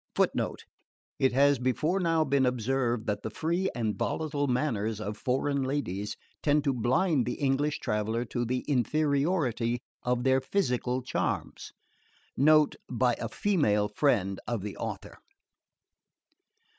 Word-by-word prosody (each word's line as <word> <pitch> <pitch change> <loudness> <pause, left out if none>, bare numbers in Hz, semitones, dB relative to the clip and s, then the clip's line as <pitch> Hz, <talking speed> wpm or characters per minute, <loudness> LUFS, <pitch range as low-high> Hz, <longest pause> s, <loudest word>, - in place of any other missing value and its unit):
(Footnote: - - 0 0.5
It 130 - +3
has 140 0 +4
before 150 +9 0
now 165 -3 +2
been 140 -2 +2
observed 125 -1 0
that 105 -1 -2
the - - -4
FREE 170 - -1
and 110 -4 -1
VOLATILE 150 -2 -1
manners 115 -5 -1
of 105 0 -4
foreign 135 +4 0
ladies 130 -8 -2 0.2
tend 150 0 +2
to 140 -2 +1
blind 130 - +1
the 125 - -1
English 145 +1 0
traveller 110 +3 -1
to 120 +1 -2
the 125 +2 -1
inferiority 140 -3 +1 0.2
of 125 0 0
their 130 0 +3
PHYSICAL 130 -6 -1
charms. - - -3 0.6
Note 155 +1 +4
by 125 0 +2
a 115 - -3
Female 110 - +1
Friend 105 -6 +1
of 115 -5 -2
the 105 -1 -5
Author.) - - -6
130 Hz, 130 wpm, -29 LUFS, 115-145 Hz, 0.6 s, has